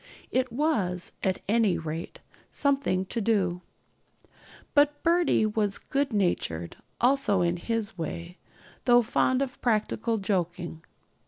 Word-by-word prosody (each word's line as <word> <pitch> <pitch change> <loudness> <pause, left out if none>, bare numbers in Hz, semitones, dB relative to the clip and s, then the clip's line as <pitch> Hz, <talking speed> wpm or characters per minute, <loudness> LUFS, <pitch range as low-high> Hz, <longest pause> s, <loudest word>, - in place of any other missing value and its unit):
It 255 -1 +1
was, 220 - 0
at 185 -1 -1
any 215 -3 +3
rate, 160 +1 -6 0.3
something 275 -10 +1
to 230 +4 -2
do. 190 -5 +1 1.1
But 290 0 +3
'Birdie' 335 -9 +3
was 210 -1 0
good 275 0 -1
natured 175 - -1 0.2
also 245 -6 +3
in 175 0 +1
his 225 +1 -3
way, 170 +2 -5 0.5
though 245 -1 +6
fond 255 +4 +2
of 275 0 -7
practical 225 0 0
joking. 175 -4 -2
215 Hz, 115 wpm, -27 LUFS, 180-255 Hz, 1.1 s, though